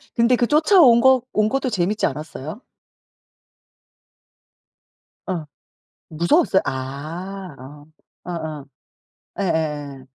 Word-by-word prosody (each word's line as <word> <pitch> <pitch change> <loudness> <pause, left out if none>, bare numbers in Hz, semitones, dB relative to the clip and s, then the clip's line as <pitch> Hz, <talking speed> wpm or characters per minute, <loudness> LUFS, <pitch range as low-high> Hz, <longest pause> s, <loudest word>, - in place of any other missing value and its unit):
근데 235 +2 +4
그 240 -1 +1
쫓아온 300 - +5
거 265 -2 +5
온 215 0 +2
것도 270 0 -1
재밌지 205 0 0
않았어요? 155 - -6 2.7
어. 175 -5 -3 0.6
무서웠어요? 190 - +2
아 155 +7 -6
어. 145 +3 -12 0.4
어 180 - -7
어. 155 -4 -5 0.8
예예예. 150 -6 -2
175 Hz, 175 characters per minute, -21 LUFS, 150-235 Hz, 2.7 s, 쫓아온